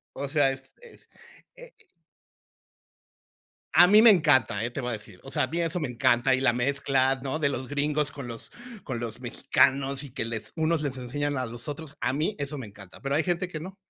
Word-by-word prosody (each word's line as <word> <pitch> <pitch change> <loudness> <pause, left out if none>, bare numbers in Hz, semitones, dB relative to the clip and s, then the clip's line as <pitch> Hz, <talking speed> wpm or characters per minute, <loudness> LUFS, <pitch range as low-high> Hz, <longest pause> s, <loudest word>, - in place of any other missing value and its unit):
O 140 +1 -4
sea, 140 -2 +2
es 135 0 -9 0.2
es, 475 - -17 0.5
eh - - -13 2.0
A 175 - +9
mí 210 +3 +7
me 230 - +9
encanta, 145 - +3
¿eh? 120 - -2
Te 140 - -5
lo - - -6
voy 125 - -2
a 110 - -3
decir. 105 -3 -14
O 135 - -10
sea, - - +1
a - - -1
mí 165 - -4
eso 170 +1 -1
me 150 - -2
encanta. 120 +1 +2
Y 130 - 0
la 130 - +3
mezcla, 135 +1 +1
¿no?, 140 +3 -2
de 150 -3 +2
los 130 -2 -4
gringos 145 0 0
con 140 -4 -7
los 115 -1 -9 0.3
con 125 -4 -4
los 115 0 -6
mexicanos 135 +2 +1
y 140 - -10
que 125 -3 -3
les 115 -2 -5
unos 160 0 +1
les 140 -3 -3
enseñan 145 +3 -2
a 130 - -1
los 120 +3 -7
otros. 145 -1 -7
A - - 0
mí 155 +9 -1
eso 145 +1 -4
me 125 - -6
encanta, 100 -2 -14
pero, 140 0 -2
hay 155 - +3
gente 175 +1 -1
que 155 -3 -6
no. 185 +3 -8
140 Hz, 230 wpm, -27 LUFS, 125-155 Hz, 2.0 s, A